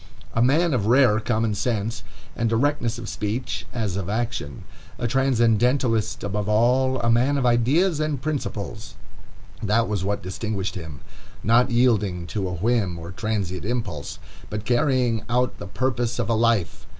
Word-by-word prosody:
A 115 - +1
man 155 +6 +3
of 105 -5 0
rare 120 -3 +5
common 110 -1 0
sense 115 +1 -2 0.3
and 115 -1 0
directness 120 0 +1
of 120 -2 -7
speech, 115 +5 -3
as 110 -6 -2
of 95 -2 -3
action; 110 - -3 0.3
a 120 - -3
transcendentalist 120 -2 +2
above 105 +1 -2
all, 125 +4 +3
a 115 0 +2
man 130 +5 +3
of 135 - 0
ideas 140 +9 +3
and 155 -3 -1
principles,—that 115 -4 -4
was 105 -3 -2
what 100 +1 -2
distinguished 100 +1 -3
him. 80 -6 -8 0.4
Not 115 +3 +4
yielding 105 -8 +2
to 100 -3 -1
a 90 - -3
whim 100 -1 0
or 85 +1 -8
transient 95 -3 -3
impulse, 105 - -3 0.3
but 105 0 -5
carrying 125 -2 +2
out 125 +1 0
the - - -7
purpose 120 +2 -1
of 120 -2 -1
a - - +3
life. 115 -5 +1
115 Hz, 150 wpm, -24 LUFS, 105-125 Hz, 0.4 s, rare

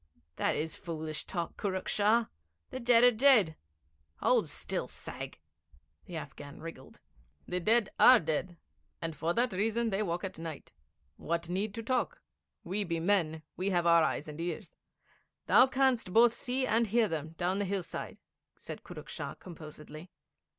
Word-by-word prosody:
'That - - +1
is 160 +1 -2
foolish 155 -2 -5
talk, 170 -3 -4
Kurruk 190 -2 -2
Shah. 220 +3 +3 0.5
The - - -4
dead 240 -1 +5
are 245 - +8
dead. 220 - +5 0.6
Hold - - +2
still, - - -1
sag.' - - -7 0.7
The 175 - -8
Afghan 145 -2 -8
wriggled. 165 -5 -10 0.5
'The 180 - -1
dead 220 +3 +2
are 255 -1 +9
dead, 170 +1 -2 0.4
and 165 -1 -4
for 165 +3 -1
that 240 -2 +2
reason 225 +4 0
they 195 +2 0
walk 175 -2 -2
at 190 -3 -5
night. 165 -3 -7 0.5
What 170 +1 -3
need 200 +3 -2
to 230 - -5
talk? 255 - -1 0.4
We 195 +4 -2
be 170 -3 -2
men; 165 -4 +1
we 185 +2 -1
have 175 -3 +1
our 170 -1 +6
eyes 155 - -1
and 150 +2 -7
ears. 170 -2 -5 0.7
Thou 260 - +6
canst 260 -6 +1
both 230 +3 +6
see 255 +1 -1
and 230 -1 +2
hear 225 +2 +3
them, 160 -2 -4
down 180 +3 -1
the 205 - 0
hillside,' 190 -2 -4 0.4
said - - -8
Kurruk - - -10
Shah - - -6
composedly. 155 -1 -11
185 Hz, 160 wpm, -31 LUFS, 165-225 Hz, 0.7 s, are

